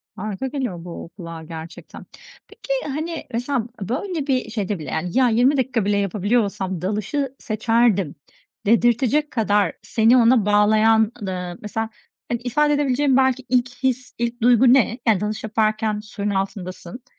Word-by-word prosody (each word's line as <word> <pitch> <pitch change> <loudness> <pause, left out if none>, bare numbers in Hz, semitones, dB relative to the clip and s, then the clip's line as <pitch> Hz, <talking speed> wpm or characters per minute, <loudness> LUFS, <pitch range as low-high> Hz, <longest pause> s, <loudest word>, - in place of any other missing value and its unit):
Harika 210 +5 -4
geliyor 245 - -4
bu 170 -1 -8
kulağa 165 -2 -8
gerçekten. 160 0 -10 0.4
Peki, - - -5 0.2
hani, 320 +2 -4
mesela 245 0 -1
böyle 290 - -3
bir 260 -2 0
şeyde 205 -4 -3
bile, 145 -4 -7
yani, 175 +8 -2
ya, 255 -2 +5
20 250 +5 +3
dakika 255 -5 0
bile 205 0 +2
yapabiliyor 205 +4 +1
olsam 190 -3 -4
dalışı 215 +8 -2
seçerdim 215 -6 +1 0.5
dedirtecek 240 +6 +2
kadar 205 -5 +1
seni 230 +2 +3
ona 230 -3 +4
bağlayan, 215 +1 +4
ııı, 180 -3 -4
mesela, 220 +1 -3 0.4
hani, 235 - -1
ifade 295 +5 +2
edebileceğin 280 -1 +2
belki 260 -1 +2
ilk 250 0 +2
his, 255 -1 -1
ilk 235 +1 -3
duygu 245 +1 +6
ne? 245 -2 +2
Yani, 215 -4 +4
dalış 215 +1 -3
yaparken 215 0 0
suyun 210 -1 -5
altındasın, 195 +2 -4
225 Hz, 145 wpm, -22 LUFS, 200-255 Hz, 0.5 s, duygu